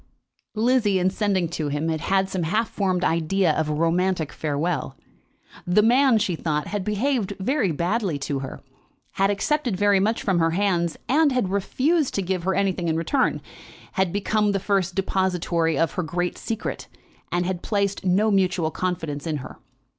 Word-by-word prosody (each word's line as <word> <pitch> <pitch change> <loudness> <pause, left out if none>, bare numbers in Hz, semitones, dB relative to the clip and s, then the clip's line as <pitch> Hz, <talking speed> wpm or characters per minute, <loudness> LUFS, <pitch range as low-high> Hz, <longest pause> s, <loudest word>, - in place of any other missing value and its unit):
Lizzie, 225 -3 +2
in 185 +1 +2
sending 195 -4 0
to 160 -3 -3
him, 145 +2 -2
had 190 +4 +1
some 190 -1 -3
half 210 +8 0
formed 185 -3 0
idea 170 +2 +2
of 155 0 -1
a - - 0
romantic 165 0 +1
farewell. 150 -2 -2 0.7
The 185 +4 +4
man, 250 +1 +5
she 200 -5 0
thought, 150 -2 -2
had 205 -2 -2
behaved 210 0 0
very 205 - +1
badly 175 +1 -1
to 140 0 -3
her, 135 -1 -7 0.5
had 195 +1 +1
accepted 240 +1 0
very 205 0 +4
much 215 +4 0
from 190 -4 +1
her 165 0 +3
hands, 175 -5 +1
and 295 +2 +3
had 250 -7 0
refused 270 - +1
to 200 - 0
give 180 -1 -2
her 190 - +1
anything 190 -3 0
in 160 0 +1
return; 260 - 0 0.5
had 190 -2 0
become 205 +1 +1
the 195 - 0
first 195 -2 0
depository 180 -4 0
of 165 -1 +2
her 185 - -2
great 180 +1 -2
secret, 225 -1 -4 0.4
and 175 0 0
had 180 -1 -2
placed 200 -2 -1
no 195 +4 +2
mutual 185 -4 +1
confidence 165 -5 -3
in 155 -2 -1
her. 130 - -9
190 Hz, 170 wpm, -24 LUFS, 170-205 Hz, 0.7 s, man